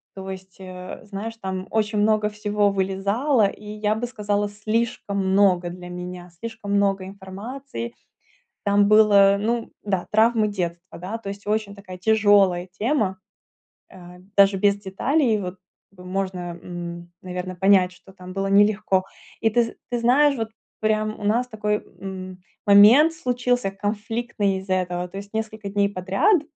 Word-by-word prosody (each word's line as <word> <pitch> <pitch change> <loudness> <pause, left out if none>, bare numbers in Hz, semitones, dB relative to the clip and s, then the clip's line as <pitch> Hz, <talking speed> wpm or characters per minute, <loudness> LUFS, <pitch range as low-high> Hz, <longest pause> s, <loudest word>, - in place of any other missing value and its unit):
То 190 0 -7
есть, 190 0 -10
э, 185 0 -9
знаешь, 210 +3 -6
там 190 0 -4
очень 215 -1 0
много 215 0 +3
всего 210 -1 0
вылезало, 200 +6 +1
и 205 - -9
я 210 0 -1
бы 235 +2 -2
сказала, 205 -3 -1
слишком 215 0 -2
много 185 -3 +3
для 180 0 -9
меня, 180 0 -7
слишком 220 -2 -5
много 195 -2 +2
информации. 225 +6 -7 0.7
Там 200 0 +3
было, 200 -2 +6
ну 230 +2 -1
да, 190 -3 -1
травмы 220 0 +4
детства, 175 -2 -5
да. 195 +6 -4
То 200 -3 -7
есть 200 +1 -8
очень 210 -1 -1
такая 185 -2 -10
тяжелая 200 -3 +3
тема, 215 -6 +1 0.7
а, 180 -1 -13 0.2
даже 200 0 +6
без 200 +1 +3
деталей 225 +5 +1
вот 180 -1 -5 0.4
можно, 180 -1 -4
м, 175 -1 -7
наверно, 180 0 -5
понять, 190 -1 +4
что 190 +1 -18
там 185 -1 -11
было 195 0 -1
нелегко. 200 -2 +3 0.4
И 225 - +3
ты 240 +2 +3
з 230 - -4 0.2
ты 240 - 0
знаешь, 275 +4 +4
вот 225 -1 -3 0.3
прям 215 0 0
у 205 - -8
нас 235 +4 +2
такой, 210 -2 -1 0.2
м, 185 -1 -7 0.2
момент 220 +11 +8
случился 245 -6 0
конфликтный 205 0 -2
из-за 190 0 -2
этого. 180 -1 -2
То 185 - -11
есть 200 +1 -8
несколько 220 -2 -4
дней 200 0 +2
подряд 200 - +2
200 Hz, 150 wpm, -23 LUFS, 185-220 Hz, 0.7 s, момент